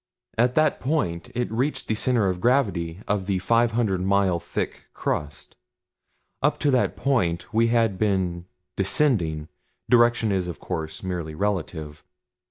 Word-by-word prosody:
At 120 +2 +2
that 155 -1 +3
point 120 - -1
it 120 -2 -1
reached 135 +4 -1
the - - +1
center 115 -1 +1
of 90 -1 -2
gravity 95 -9 +1
of 100 -3 -1
the 100 -2 +1
five 115 +4 +2
hundred 105 -6 +1
mile 95 -2 +2
thick - - -4
crust. 75 -1 -3 0.9
Up 145 +2 +2
to 145 - +3
that 130 -2 +2
point 115 -9 0
we 115 +1 +4
had 115 -5 +1
been 95 -5 0 0.3
descending 95 - +2 0.4
direction 120 -2 +4
is, 95 -2 0
of 85 - -6
course, 80 -2 -5
merely 85 -4 -4
relative. 80 -6 -3
100 Hz, 145 wpm, -24 LUFS, 85-120 Hz, 0.9 s, we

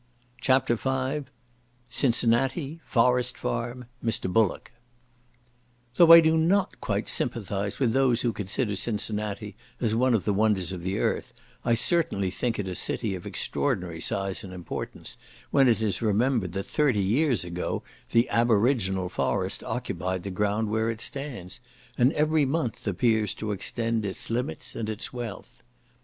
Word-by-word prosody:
CHAPTER 130 -2 +3
V 135 +2 -2 0.6
Cincinnati—Forest 125 +1 +1
Farm—Mr. 115 - -3
Bullock 110 -4 +1 1.2
Though 170 +3 +7
I 165 0 +12
do 160 0 +3
not 185 +5 +1
quite - - -1
sympathise 100 -2 -2
with 120 -5 +2
those 130 -3 +3
who 120 -2 0
consider 105 +2 -2
Cincinnati 105 -1 -2 0.2
as 115 -3 0
one 125 +1 +3
of 100 - -1
the 105 - +2
wonders 100 -4 +2
of 90 -2 -5
the 95 +3 -2
earth, - - -1 0.3
I 120 -1 +3
certainly 115 - +1
think 115 +3 -1
it 105 - -3
a 95 - -3
city 105 +2 -2
of 90 - -6
extraordinary 85 -2 -2
size 95 +1 -2
and 95 -2 -8
importance, 90 -2 -6 0.3
when 135 -2 +5
it 115 -2 +3
is 105 -1 0
remembered 110 -3 +1
that 95 +1 -3
thirty 125 -5 +2
years 120 - +2
ago 85 0 -3 0.3
the 115 +2 +3
aboriginal 110 -5 +2
forest - - -1
occupied 95 0 -3
the 100 - -4
ground 105 +3 0
where 110 +1 +1
it 115 -1 -3
stands; 135 -11 -4 0.4
and 125 +3 +4
every 155 0 +2
month 135 -6 -2
appears 110 +2 +1
to 110 -1 -4
extend 115 +2 -2
its 100 +2 -3
limits 125 +5 -3
and 110 -2 -3
its 110 +3 -4
wealth. 120 -6 -7
115 Hz, 145 wpm, -27 LUFS, 100-130 Hz, 1.2 s, I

